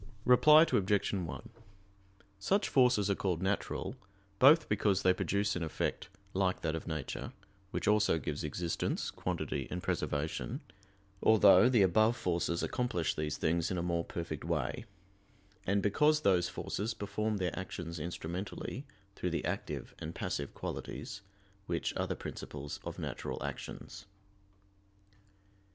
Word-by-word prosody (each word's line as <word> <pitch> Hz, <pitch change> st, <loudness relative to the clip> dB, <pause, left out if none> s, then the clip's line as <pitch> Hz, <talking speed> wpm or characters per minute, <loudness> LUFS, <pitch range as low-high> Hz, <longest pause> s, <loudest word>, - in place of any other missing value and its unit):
Reply 150 Hz, +5 st, +8 dB
Obj. 100 Hz, -, +1 dB
1: 90 Hz, -5 st, -4 dB, 0.9 s
Such 195 Hz, -, +1 dB
forces 125 Hz, -6 st, +4 dB
are -, -, +4 dB
called 95 Hz, -3 st, -1 dB
natural, 95 Hz, +1 st, -1 dB, 0.4 s
both 150 Hz, +5 st, +7 dB
because 100 Hz, -2 st, +2 dB
they 90 Hz, -, +5 dB
produce 100 Hz, +2 st, 0 dB
an 90 Hz, -, -2 dB
effect 85 Hz, +3 st, -2 dB, 0.2 s
like 95 Hz, -1 st, +1 dB
that 80 Hz, -1 st, -1 dB
of 80 Hz, -, -5 dB
nature, 80 Hz, -5 st, -4 dB, 0.4 s
which -, -, -3 dB
also 105 Hz, -4 st, +4 dB
gives 75 Hz, -2 st, -3 dB
existence, 85 Hz, +3 st, -2 dB
quantity 65 Hz, -, -3 dB
and 90 Hz, 0 st, -4 dB
preservation 75 Hz, +2 st, -2 dB, 0.6 s
(although 105 Hz, 0 st, +7 dB
the 120 Hz, -6 st, +5 dB
above 110 Hz, +6 st, +4 dB
forces 85 Hz, -3 st, 0 dB
accomplish 120 Hz, -10 st, 0 dB
these 75 Hz, -1 st, -2 dB
things 85 Hz, +1 st, +1 dB
in 95 Hz, -, -2 dB
a 85 Hz, -, -1 dB
more 85 Hz, -1 st, 0 dB
perfect 85 Hz, -3 st, -5 dB
way); -, -, -2 dB, 0.8 s
and 100 Hz, +1 st, +2 dB
because 150 Hz, +9 st, +3 dB
those 90 Hz, -, +3 dB
forces 105 Hz, +4 st, -3 dB
perform 105 Hz, +1 st, -2 dB
their 90 Hz, -2 st, -1 dB
actions 85 Hz, -3 st, -5 dB
instrumentally, 90 Hz, -, -5 dB, 0.3 s
through 90 Hz, -, -2 dB
the 85 Hz, -, -2 dB
active -, -, -4 dB
and -, -, -6 dB
passive 70 Hz, -1 st, -3 dB
qualities, 100 Hz, -, -5 dB, 0.5 s
which 85 Hz, -1 st, -1 dB
are -, -, -1 dB
the -, -, -2 dB
principles 70 Hz, 0 st, -6 dB
of -, -, -6 dB
natural -, -, -4 dB
actions. -, -, -7 dB
95 Hz, 135 wpm, -33 LUFS, 85-105 Hz, 0.9 s, Reply